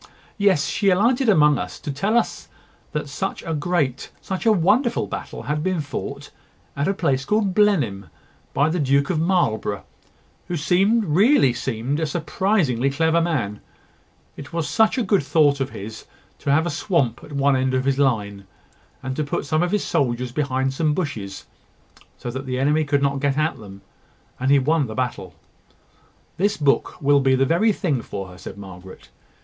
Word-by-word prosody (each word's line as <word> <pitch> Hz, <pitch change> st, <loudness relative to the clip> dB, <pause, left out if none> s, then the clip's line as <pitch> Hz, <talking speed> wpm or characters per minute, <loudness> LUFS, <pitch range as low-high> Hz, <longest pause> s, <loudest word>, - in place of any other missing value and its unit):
"Yes: 190 Hz, -7 st, +3 dB
she 200 Hz, -, +1 dB
alighted 235 Hz, +7 st, +3 dB
among 150 Hz, -7 st, +5 dB
us -, -, -6 dB
to 150 Hz, -, -5 dB
tell 200 Hz, -, 0 dB
us 235 Hz, -, -2 dB, 0.4 s
that 150 Hz, -2 st, -3 dB
such 165 Hz, +7 st, -4 dB
a 165 Hz, -, -3 dB
great, 150 Hz, -4 st, -1 dB
such 190 Hz, +4 st, -4 dB
a -, -, +7 dB
wonderful 220 Hz, +6 st, +2 dB
battle -, -, -7 dB
had 150 Hz, 0 st, -2 dB
been 185 Hz, +1 st, -1 dB
fought, 145 Hz, -3 st, -6 dB, 0.4 s
at 140 Hz, +3 st, -1 dB
a 195 Hz, -, +2 dB
place 135 Hz, -7 st, 0 dB
called 210 Hz, +2 st, +1 dB
Blenheim, 165 Hz, -, +2 dB, 0.4 s
by 145 Hz, -, +2 dB
the 175 Hz, +2 st, -1 dB
Duke 140 Hz, +2 st, +2 dB
of 165 Hz, -, 0 dB
Marlborough, 135 Hz, -, 0 dB, 0.6 s
who 175 Hz, -, -3 dB, 0.5 s
really 180 Hz, -, +4 dB
seemed 125 Hz, +3 st, -2 dB
a 160 Hz, -, 0 dB
surprisingly 155 Hz, -, 0 dB
clever 160 Hz, +4 st, +2 dB
man: 130 Hz, -12 st, -2 dB, 0.7 s
it 140 Hz, -3 st, -10 dB
was 165 Hz, -2 st, -2 dB
such 220 Hz, -, +2 dB
a 250 Hz, -, +1 dB
good 200 Hz, -1 st, +2 dB
thought 145 Hz, 0 st, +3 dB
of 135 Hz, 0 st, -1 dB
his 110 Hz, 0 st, -9 dB, 0.3 s
to 140 Hz, -, -1 dB
have 160 Hz, +4 st, +3 dB
a 175 Hz, -, -1 dB
swamp 145 Hz, -, 0 dB
at 150 Hz, -, -11 dB
one 140 Hz, 0 st, +2 dB
end 130 Hz, 0 st, 0 dB
of 130 Hz, 0 st, 0 dB
his 135 Hz, 0 st, +1 dB
line, 100 Hz, -7 st, 0 dB, 0.6 s
and 130 Hz, 0 st, -3 dB
to 155 Hz, -, 0 dB
put 145 Hz, -, -3 dB
some 155 Hz, +3 st, +1 dB
of 175 Hz, -, +1 dB
his 205 Hz, +1 st, 0 dB
soldiers 125 Hz, -2 st, -1 dB
behind 135 Hz, -1 st, -1 dB
some 150 Hz, +1 st, 0 dB
bushes, 110 Hz, -, -4 dB, 0.7 s
so 120 Hz, -, -5 dB
that 130 Hz, +2 st, -6 dB
the 125 Hz, 0 st, -2 dB
enemy 150 Hz, +4 st, +2 dB
could 145 Hz, -1 st, 0 dB
not 140 Hz, 0 st, +1 dB
get 140 Hz, 0 st, 0 dB
at 155 Hz, +2 st, 0 dB
them! 100 Hz, -2 st, -12 dB, 0.6 s
and 130 Hz, +1 st, 0 dB
he 140 Hz, -, +6 dB
won 145 Hz, +1 st, +1 dB
the 110 Hz, -, -7 dB
battle." 115 Hz, -8 st, -3 dB, 1.0 s
"This 205 Hz, +3 st, +1 dB
book 145 Hz, -2 st, +1 dB
will 145 Hz, 0 st, +5 dB
be 135 Hz, -1 st, +3 dB
the 135 Hz, +1 st, +2 dB
very 175 Hz, +10 st, +3 dB
thing 155 Hz, -, -1 dB
for 95 Hz, -4 st, -6 dB
her," 90 Hz, 0 st, -13 dB
said 95 Hz, +2 st, -9 dB
Margaret. 95 Hz, -2 st, -11 dB
145 Hz, 180 wpm, -22 LUFS, 130-175 Hz, 1.0 s, a